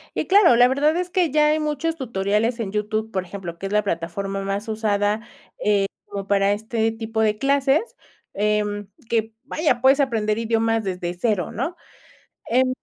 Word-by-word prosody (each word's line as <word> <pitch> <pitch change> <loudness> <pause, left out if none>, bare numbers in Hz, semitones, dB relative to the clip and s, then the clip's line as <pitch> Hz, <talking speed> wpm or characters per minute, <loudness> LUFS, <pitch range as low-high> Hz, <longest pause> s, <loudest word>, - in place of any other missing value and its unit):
Y - - -2
claro, 385 - +6
la 245 +1 +6
verdad 290 +4 +2
es 360 0 -2
que 355 -3 +1
ya 300 0 +4
hay 305 +1 +2
muchos 305 +2 -1
tutoriales 225 -2 -1
en 210 -4 -3
YouTube, 215 +1 -2
por 190 -1 -1
ejemplo 175 -2 -7
que 195 - -4
es - - -8
la 210 - +3
plataforma 195 +2 -3
más 195 +3 -3
usada, 210 -1 0 0.2
eh, - - -23 0.7
como 200 -1 -6
para 200 0 +3
este 220 +1 -1
tipo 225 0 -3
de 215 -1 +2
clases, 275 - +1 0.4
em, 210 -1 0 0.2
que, 225 -1 0
vaya 300 -3 0
puedes 270 +2 +5
aprender 220 -5 +1
idiomas 225 0 +1
desde 180 -2 -3
0, 185 -1 -1
¿no? 295 +10 -3 0.7
Em, 255 +2 +3
220 Hz, 175 wpm, -22 LUFS, 200-265 Hz, 0.7 s, claro